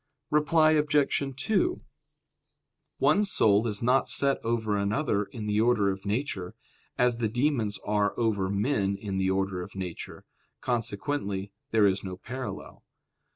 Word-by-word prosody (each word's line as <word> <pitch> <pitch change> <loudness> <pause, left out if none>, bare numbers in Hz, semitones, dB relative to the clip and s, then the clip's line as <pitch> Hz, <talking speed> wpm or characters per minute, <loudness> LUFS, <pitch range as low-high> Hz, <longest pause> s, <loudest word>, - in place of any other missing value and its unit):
Reply 155 +1 +4
Obj. 150 -2 +2 0.2
2: 285 - 0 1.2
One 210 - +3
soul 110 - +3
is 105 0 -1
not 125 +3 +2
set 140 -1 +3
over 115 -2 0
another 105 +1 0
in 110 0 -8
the 105 0 +1
order 110 -4 +3
of 95 +1 -7
nature, 100 -5 -3 0.4
as 125 -1 +2
the 115 -2 -1
demons 120 -4 0
are 105 -1 0
over 105 -5 0
men 100 -1 0
in 100 -1 -4
the 95 0 +1
order 95 -1 -1
of 90 - -9
nature; 90 -3 -7 0.3
consequently 105 -3 -2 0.2
there 110 -2 +4
is 100 0 +1
no 95 -2 -6
parallel. 120 0 -7
110 Hz, 140 wpm, -27 LUFS, 100-130 Hz, 1.2 s, Reply